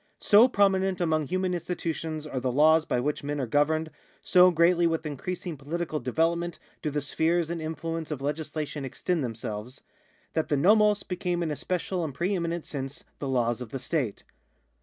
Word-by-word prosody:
So 225 +4 +6
pi'ominent 195 -4 +2
among 155 -4 +1
human 185 +2 0
institutions 165 -3 -3
are 135 -4 -3
the 125 0 -1
laws 155 +4 +5
by 125 - 0
which 145 +4 -2
men 145 0 -2
are 135 - 0
governed, 155 +5 +1 0.3
so 180 0 +6
greatly 170 0 +4
with 165 -1 -1
increasing 165 +3 -4
political 155 +3 -3
develop 165 +7 +1
ment 175 -1 -5 0.2
do 150 - -1
the 150 0 -2
spheres 165 +3 +1
and 170 -1 -3
influence 165 +1 -4
of 150 - -2
legislatioii 150 0 -3
extend 155 +5 -2
themselves, 115 +1 -5 0.5
that 160 - -1
the 145 - +3
I'o^oi 210 +6 +4
became 180 -1 -1
in 160 - -2
a - - -1
special 180 +2 -2
and 145 -5 -4
pre 180 +7 0
eminent 170 -2 -2
sense 135 -1 -6 0.2
the 140 - -3
laws 120 -2 +1
of 125 - -6
the 135 - -4
state. 130 -5 -2
160 Hz, 180 wpm, -27 LUFS, 145-175 Hz, 0.5 s, So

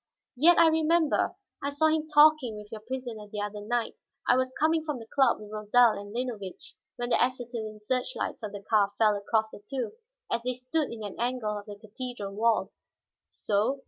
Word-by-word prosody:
Yet 335 +7 +6
I 335 - +7
remember; 320 +1 +2 0.3
I 280 - -1
saw 290 +2 +1
him 315 0 +2
talking 300 -6 +5
with 210 0 -11
your 220 -1 -7
prisoner 235 -3 -6
the 205 0 -5
other 205 0 -4
night. 235 +2 -2 0.3
I - - +6
was 255 0 +1
coming 320 +1 +2
from 300 -4 -3
the 230 - -9
club 270 +4 +2
with 210 -1 -11
Rosal 215 +3 +4
and 205 0 -9
Linovitch, 230 -5 -5 0.2
when 240 0 -4
the - - +3
acetylene 235 -4 -4
search 255 - -1
lights - - -3
of 215 -2 -5
the 205 -1 -8
car 205 -1 +2
fell 215 -2 +4
across 220 +2 0
the - - -10
two, 265 -3 -2 0.4
as 235 - +1
they 250 +1 -1
stood 255 +5 -1
in 225 -2 -7
an 205 - -7
angle 240 -3 -1
of 205 0 -7
the 205 - -7
cathedral 220 -1 -6
wall." 225 +2 +1 0.6
"So? 220 +7 0
240 Hz, 200 wpm, -28 LUFS, 210-265 Hz, 0.6 s, I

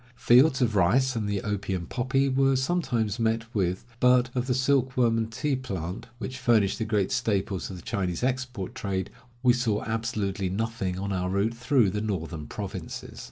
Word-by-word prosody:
Fields 130 +4 +5
of 115 -3 0
rice 125 +8 +3
and 105 -2 -1
the 100 -2 -1
opium 95 -4 -2
poppy 130 +6 0
were 135 0 +3
sometimes 130 - 0
met 115 0 +1
with, 95 -2 -1
but 125 0 +4
of 125 0 -1
the 125 - +2
silk 130 -1 +1
worm 120 -2 +4
and 115 0 -1
tea 140 +5 0
plant, 95 -9 -5
which 125 +4 -6
furnish 115 -6 +3
the 110 - -2
great 105 -4 0
staples 100 -5 -1
of 95 - -6
the 90 - -10
Chinese 95 -3 -2
export 125 -6 -2
trade, 95 -1 -3 0.3
we 125 -1 +6
saw 115 -4 0
absolutely 105 -4 -2
nothing 100 -2 -2
on 100 +1 -3
our 90 -1 -1
route 100 +4 +1
through 120 -3 +2
the 105 +2 -2
northern 85 -7 -3
provinces. - - -6
115 Hz, 180 wpm, -27 LUFS, 100-125 Hz, 0.3 s, we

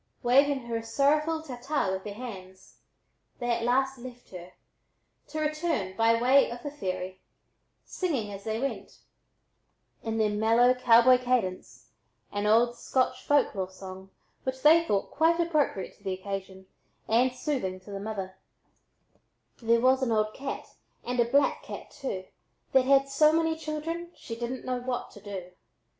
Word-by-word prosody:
Waving 275 +3 +4
her 235 -1 -3
a 225 - -5
sorrowful 300 +6 +1
"ta 250 -6 -8
ta" 275 -7 0
with 190 0 -3
their 205 -1 -7
hands, 190 -6 -10 0.6
they 240 -1 -2
at 235 0 0
last 265 +2 +1
left 245 0 -11
her, 180 -1 -10 0.7
to 310 - -5
return 305 - -1
by 230 +2 +3
way 260 +3 +5
of 240 +1 -8
the 290 - -4
ferry, 185 -8 -5 0.6
singing 270 - -2
as 195 0 -8
they 220 +1 -2
went, 275 +2 -4 1.0
in 225 0 -3
their 215 -1 +2
mellow 225 +4 +4
cowboy 250 0 +6
cadence, 245 -7 -2 0.4
an 205 0 -1
old 235 +3 +4
Scotch 255 +1 0
folk 290 -1 +3
lore 190 -2 -3
song 190 0 -10 0.3
which 260 0 -4
they 325 +3 +7
thought 205 -11 -1
quite 330 +3 +3
appropriate 305 - 0
to - - -26
the 190 -2 -2
occasion 190 0 -6 0.4
and 245 +3 +3
soothing 250 -9 -2
to 205 - -12
the 200 - -5
mother: 195 -3 -5 1.2
There 230 0 +3
was 260 +1 +4
an 255 -3 0
old 215 -1 +1
cat, 275 0 -5 0.4
and 245 0 -2
a 240 - +5
black 280 +2 +3
cat, - - -9
too, 190 -9 -5 0.5
That 265 -1 +4
had 275 0 +4
so 305 +3 +4
many 325 0 +1
children, 320 +2 -4
she 230 - -7
didn't 240 +2 -5
know 255 -1 -1
what 245 0 -4
to 205 - -14
do. 190 -3 -7
240 Hz, 160 wpm, -28 LUFS, 205-275 Hz, 1.2 s, they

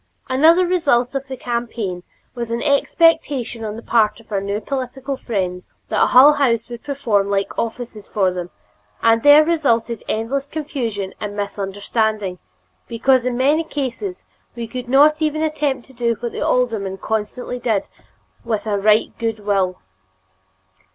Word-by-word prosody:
Another 320 +7 +5
result 280 -9 +1
of 275 0 -3
the 260 -1 -6
campaign 235 -7 -3 0.3
was 235 -2 -5
an 235 +1 -2
expectation 280 -5 +2
on 215 -1 -4
the 230 - -9
part 220 -2 +2
of 225 - -20
our 200 -2 0
new 200 +1 -2
political 265 +3 -4
friends 185 -7 -3 0.2
that - - +3
Hull 275 +4 +8
House 240 -6 +1
would 240 -1 -8
perform 235 -9 0
like 200 0 -1
offices 230 -2 -5
for 190 -3 +1
them, 180 -1 -5 0.5
and 230 0 +4
there 290 +3 +7
resulted 240 -9 0
endless 265 +6 -2
confusion 245 -11 -4
and 205 -1 -5
misunderstanding 200 0 -2 0.5
because 250 +2 +2
in 245 -1 -1
many 290 +5 +3
cases 295 - -4 0.3
we 235 -1 -4
could 250 +1 -6
not 300 +4 +5
even 310 0 0
attempt 295 -5 -1
to 265 - -18
do 235 -1 0
what 235 -1 -4
the - - -6
alderman 220 -6 0
constantly 220 +5 -3
did 220 -5 0 0.6
with 220 -3 -2
a 205 -2 0
right 210 +2 +3
good 225 -2 -2
will. 195 -3 0
235 Hz, 150 wpm, -20 LUFS, 210-275 Hz, 0.6 s, Hull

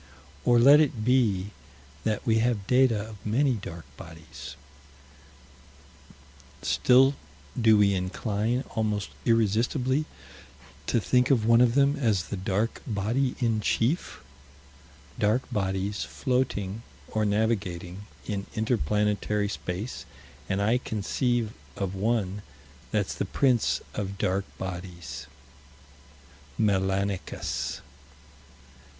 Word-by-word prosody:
Or 120 - +5
let 140 +5 +8
it 125 -8 +1
be 105 -6 +2 0.5
that 110 -1 -1
we 110 -1 +3
have 115 -4 0
data 125 -2 +4
of 105 -4 -12
many 130 +5 +2
dark 85 - -7
bodies 80 -3 -10 2.1
still 130 +2 +5 0.5
do 110 -1 +6
we 100 -1 +4
incline 105 +6 -1
almost 105 -3 -1
irresistibly 120 +5 +2 0.8
to - - +2
think 125 +3 +2
of 120 -6 +3
one 115 +1 +6
of 120 -1 +4
them 140 0 +4
as 105 -9 0
the - - -2
dark 100 +4 -1
body 115 +5 0
in 115 -4 +1
chief. 125 - 0 1.0
Dark 110 +5 +2
bodies, 95 -1 -1
floating, 115 -6 -1 0.3
or 110 - 0
navigating, 100 -3 -1 0.2
in 100 -2 -3
inter 110 +2 +1
planetary 105 +3 0
space 100 +4 -5 0.4
and 100 +1 0
I 115 +4 +3
conceive 115 +1 -1 0.2
of 100 -2 -3
one 105 -1 -1 0.5
that's 105 -3 0
the - - -2
Prince 125 -5 +2
of 100 -1 -4
Dark 95 +1 0
Bodies: 90 -3 -6 1.3
Melanicus. 95 -2 -1
105 Hz, 105 wpm, -27 LUFS, 100-120 Hz, 2.1 s, let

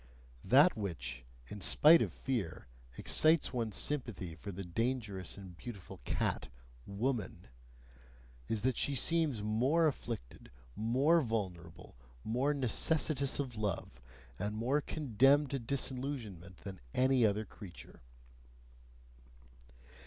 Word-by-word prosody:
That 145 - +6
which, 65 - -5 0.2
in 105 - -8
spite 160 - +7
of - - 0
fear, 115 -11 -3 0.3
excites 155 -2 +3
one's 115 -4 -2
sympathy 115 - -1
for 90 +6 -8
the 95 +1 -6
dangerous 105 -1 -2
and 95 -3 -10
beautiful 100 -1 -9
cat, - - -1 0.4
"woman," 105 - -3 1.0
is 110 -1 -2
that 130 -2 +1
she 140 - +1
seems 150 -6 +1
more 130 +10 +2
afflicted, 115 - -4 0.3
more 135 +10 +3
vulnerable, 95 - -4 0.3
more 125 +6 +1
necessitous 140 +1 +1
of 130 -4 -3
love, 100 - -3 0.4
and 105 +1 -2
more 130 +7 +1
condemned 140 0 +3
to 135 - -1
disillusionment 120 - -3
than 95 -2 -7 0.2
any 130 -1 +4
other 105 0 +2
creature. 95 -6 -12
115 Hz, 110 wpm, -34 LUFS, 100-135 Hz, 1.0 s, spite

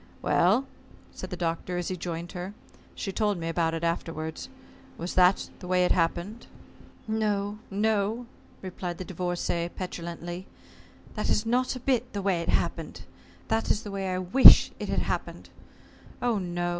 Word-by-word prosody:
"Well," 210 +10 +3 0.5
said - - -7
the - - -5
Doctor, 170 +1 -2
as 175 - -2
he 185 - -2
joined 170 0 -5
her 185 +3 -6 0.4
she 195 - -3
told 205 -1 0
me 165 -1 -4
about 165 0 0
it 165 - -4
afterwards 165 +3 -3 0.5
"was 170 +2 -4
that 185 +1 +4
the 180 - -9
way 180 0 +3
it - - +2
happened?" 175 +6 0 0.6
"No, 210 -1 -1
no," 215 +3 0 0.4
replied 180 -2 -5
the 185 - -6
Divorcée, 175 -1 -2
petulantly. 175 0 -6 0.7
"That - - -2
is 210 - +2
not 250 +3 +1
a - - -5
bit 250 -1 0
the 200 - -2
way 185 -4 +1
it 170 - -4
happened. - - -1 0.5
That 225 0 0
is 215 - +1
the 205 - -6
way 195 -1 -2
I 185 - -1
wish 185 +9 +8
it - - -4
had - - +1
happened. - - -4 0.7
Oh, 240 -4 +1
no. 175 -1 -2
185 Hz, 165 wpm, -28 LUFS, 175-210 Hz, 0.7 s, wish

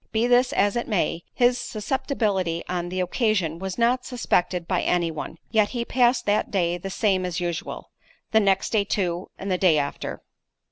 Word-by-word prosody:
Be 220 +1 +1
this 245 +1 +4
as 200 +2 +2
it 240 - -2
may, 175 -5 -1
his 245 0 +2
susceptibility 215 -7 -1
on 175 -1 -2
the 185 +1 -2
occasion 180 - 0
was 190 0 -4
not 245 +2 +2
suspected 180 -8 0
by 180 - +1
any 175 -2 +1
one—yet 205 +7 -1
he 240 -2 -3
passed 245 0 +2
that 205 +1 +1
day 175 -3 0
the 195 - -5
same 190 -1 +1
as 180 -1 -2
usual; 175 -2 -4 0.4
the 220 - +5
next 195 -2 +2
day 215 -3 +3
too, 180 -3 -2
and 195 0 -4
the 180 - +1
day 175 -5 +4
after. 140 -1 -3
195 Hz, 180 wpm, -24 LUFS, 175-235 Hz, 0.4 s, the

